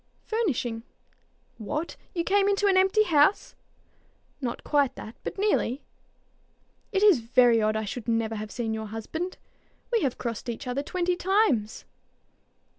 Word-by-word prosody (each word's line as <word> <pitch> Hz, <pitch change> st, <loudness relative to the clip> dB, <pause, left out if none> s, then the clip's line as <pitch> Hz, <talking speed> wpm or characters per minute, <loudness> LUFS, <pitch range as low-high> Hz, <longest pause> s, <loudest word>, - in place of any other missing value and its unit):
"Furnishing." 265 Hz, -, -1 dB, 0.8 s
"What! 300 Hz, +10 st, -4 dB, 0.2 s
you 340 Hz, -, 0 dB
came 400 Hz, +2 st, +3 dB
into 405 Hz, 0 st, +1 dB
an 395 Hz, -1 st, +4 dB
empty 380 Hz, +3 st, +4 dB
house?" 315 Hz, 0 st, +3 dB, 0.9 s
"Not 240 Hz, -3 st, -4 dB
quite 285 Hz, -3 st, +1 dB
that, 220 Hz, -, -9 dB
but -, -, -5 dB
nearly." 385 Hz, -, 0 dB, 1.1 s
"It 395 Hz, -1 st, +1 dB
is 400 Hz, -10 st, +6 dB
very 235 Hz, -1 st, +4 dB
odd 215 Hz, 0 st, +1 dB
I 220 Hz, 0 st, -1 dB
should 225 Hz, +3 st, -6 dB
never 225 Hz, -1 st, 0 dB
have 215 Hz, -1 st, -5 dB
seen 225 Hz, -1 st, -3 dB
your 220 Hz, 0 st, -4 dB
husband. 320 Hz, -, -5 dB, 0.5 s
We 465 Hz, -, +2 dB
have 270 Hz, -5 st, -1 dB
crossed 235 Hz, 0 st, -4 dB
each 235 Hz, +3 st, -5 dB
other 250 Hz, +2 st, -2 dB
twenty 360 Hz, +4 st, -1 dB
times." 355 Hz, -, +1 dB
275 Hz, 145 wpm, -27 LUFS, 225-380 Hz, 1.1 s, is